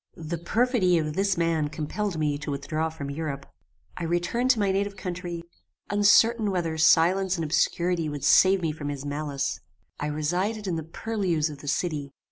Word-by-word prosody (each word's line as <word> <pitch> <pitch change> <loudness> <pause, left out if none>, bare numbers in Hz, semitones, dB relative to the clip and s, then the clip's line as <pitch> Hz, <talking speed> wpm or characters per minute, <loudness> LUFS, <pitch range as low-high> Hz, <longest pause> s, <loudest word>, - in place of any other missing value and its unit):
"The 165 +1 -5
perfidy 215 -1 +2
of 155 -2 -1
this 195 +1 +1
man 165 -3 +1
compelled 160 +5 -3
me 150 -2 0
to 150 - -6
withdraw 155 +3 -2
from 140 -3 -6
Europe. 140 -2 -4 0.5
I - - -5
returned 175 +9 0
to 250 -4 +4
my 200 -2 +2
native 200 +1 -1
country, 175 -2 -5 0.5
uncertain 210 +2 +4
whether 170 -4 -1
silence 180 +4 +4
and 165 - -2
obscurity 170 +1 +1
would 145 -2 -6
save 190 -1 +5
me 160 - +1
from 150 -1 -5
his 140 -1 -5
malice. 145 -1 -3 0.4
I 145 - -2
resided 180 +9 -1
in 180 -3 -1
the 160 - -2
purlieus 180 -7 -1
of 145 - -10
the 145 - -11
city. 145 -3 -2
170 Hz, 175 wpm, -26 LUFS, 150-195 Hz, 0.5 s, save